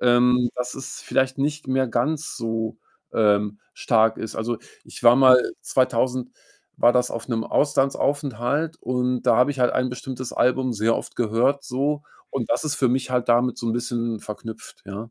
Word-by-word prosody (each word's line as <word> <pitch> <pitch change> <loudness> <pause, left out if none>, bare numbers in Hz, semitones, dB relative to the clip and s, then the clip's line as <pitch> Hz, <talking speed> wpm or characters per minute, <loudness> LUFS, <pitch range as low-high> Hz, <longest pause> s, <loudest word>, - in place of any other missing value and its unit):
ähm, 125 0 +4
dass 125 0 -3
es 135 -1 -6
vielleicht 130 0 0
nicht 150 +2 -2
mehr 130 0 +1
ganz 150 +7 -1
so, 115 -1 -3 0.3
ähm, 105 -1 +2 0.2
stark 110 -1 +2
ist. 110 - -6
Also, 115 +1 -2 0.3
ich - - -11
war 120 0 +7
mal 130 -1 +7 0.2
2000 130 0 0 0.5
war 120 - +6
das 125 0 +1
auf 115 - -5
'nem 115 -3 -1
Auslandsaufenthalt, 145 +2 0
und 125 0 -1
da 120 -2 +4
habe 125 +4 +4
ich 140 - -5
halt 125 -1 +3
ein 130 0 +1
bestimmtes 125 0 -6
Album 130 +1 +1
sehr 115 +1 +1
oft - - -6
gehört 120 +5 +1
so 145 +3 -1 0.3
und 125 -4 -3
das - - +1
ist 155 -2 -1
für 130 - +2
mich 130 +1 0
halt 125 -1 0
damit 125 +1 +3
so 120 - -4
'n 115 - +1
bisschen 120 -2 -2
verknüpft, 110 +1 -9
ja. 105 +4 -7
125 Hz, 180 wpm, -23 LUFS, 115-130 Hz, 0.5 s, war